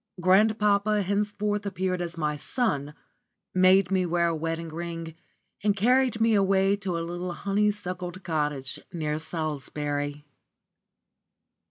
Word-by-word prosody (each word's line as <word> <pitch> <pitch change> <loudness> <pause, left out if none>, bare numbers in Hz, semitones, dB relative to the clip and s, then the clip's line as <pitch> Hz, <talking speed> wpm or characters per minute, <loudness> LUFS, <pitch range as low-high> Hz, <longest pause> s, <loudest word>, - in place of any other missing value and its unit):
Grandpapa 210 +2 +3
henceforth 205 +1 -1
appeared 185 -2 -2
as 170 -1 -4
my 150 -2 0
son, 150 - -2 0.6
made 185 0 +5
me 190 -1 +2
wear 170 -1 +1
a 165 - -1
wedding 165 +1 -3
ring, 165 0 -5 0.5
and 205 -1 +2
carried 250 +2 +3
me 225 0 +4
away 195 -1 +3
to 195 -4 -3
a 165 - -3
little 175 +1 -4
honeysuckle 195 -2 -1
covered 185 +2 -11
cottage 150 -5 -2
near 155 -2 -2
Salisbury. 145 -2 -3
180 Hz, 125 wpm, -27 LUFS, 165-200 Hz, 0.6 s, made